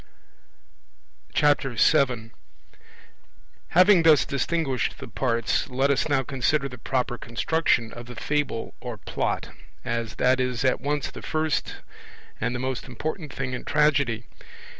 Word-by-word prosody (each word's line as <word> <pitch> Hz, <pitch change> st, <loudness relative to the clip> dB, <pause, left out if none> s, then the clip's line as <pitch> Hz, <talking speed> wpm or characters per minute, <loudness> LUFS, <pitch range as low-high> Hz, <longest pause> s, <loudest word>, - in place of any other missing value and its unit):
7 135 Hz, -4 st, +3 dB, 1.4 s
Having 180 Hz, +1 st, +6 dB
thus 160 Hz, -3 st, +6 dB
distinguished 140 Hz, -2 st, -1 dB
the -, -, -8 dB
parts, 115 Hz, -1 st, 0 dB
let 135 Hz, +2 st, +2 dB
us 140 Hz, +3 st, +1 dB
now 135 Hz, -2 st, +2 dB
consider 140 Hz, +2 st, 0 dB
the 125 Hz, -2 st, -10 dB
proper 125 Hz, -2 st, -1 dB
construction 115 Hz, -1 st, 0 dB
of 120 Hz, 0 st, -9 dB
the 125 Hz, -, -9 dB
Fable 145 Hz, -2 st, -2 dB
or -, -, -6 dB
Plot, -, -, -2 dB, 0.4 s
as 115 Hz, -2 st, -2 dB
that 130 Hz, +1 st, +3 dB
is 125 Hz, 0 st, -1 dB
at 130 Hz, -, +2 dB
once 145 Hz, 0 st, -1 dB
the -, -, -9 dB
first 155 Hz, -1 st, -1 dB, 0.6 s
and 125 Hz, -, -1 dB
the -, -, -3 dB
most 130 Hz, 0 st, -3 dB
important 155 Hz, -, -5 dB
thing 130 Hz, -2 st, -4 dB
in 125 Hz, -, -4 dB
Tragedy. 140 Hz, -7 st, +2 dB
130 Hz, 130 wpm, -25 LUFS, 120-150 Hz, 1.4 s, Having